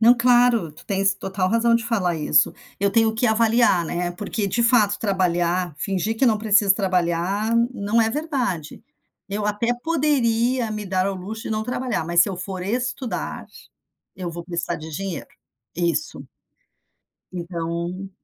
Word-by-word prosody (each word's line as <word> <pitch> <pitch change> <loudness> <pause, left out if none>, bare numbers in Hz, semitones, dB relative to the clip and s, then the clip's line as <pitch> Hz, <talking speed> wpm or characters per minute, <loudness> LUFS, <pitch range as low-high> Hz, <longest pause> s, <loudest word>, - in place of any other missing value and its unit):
Não, 235 +2 +7
claro, 240 -6 +4
tu 150 - -16
tens 195 0 +1
total 190 -1 -2
razão 230 +2 +3
de 230 0 +1
falar 200 -7 0
isso, 150 -2 +3 0.3
eu 200 +1 +1
tenho 220 +1 +3
que 235 +2 +1
avaliar, 225 -4 +3
né, 175 +2 -2
porque, 205 +3 -3
de 235 +5 0
fato 225 -4 +3
trabalhar, 180 -3 0
fingir 195 +5 -1
que 265 - +4
não 220 -3 +4
precisa 210 -2 +4
trabalhar, 190 +2 0 0.2
não 210 0 +1
é 225 0 +2
verdade. 250 - -3 0.5
Eu 205 +1 -2
até 210 +3 -1
poderia 255 -6 +1
me 210 -1 -4
dar 185 0 0
ao 195 - -1
luxo 205 +4 -7
de - - -5
não 215 0 -1
trabalhar, 250 -6 -2
mas 170 +1 +3
se - - 0
eu 190 - -4
for 185 0 -5
estudar, 245 +4 -3 0.7
eu 180 -2 -4
vou 170 0 -7
precisar 170 -1 -3
de 155 +1 -9
dinheiro. 175 0 -5 0.5
Isso 165 -3 -2 1.1
então 170 +1 -4
200 Hz, 160 wpm, -23 LUFS, 180-230 Hz, 1.1 s, Não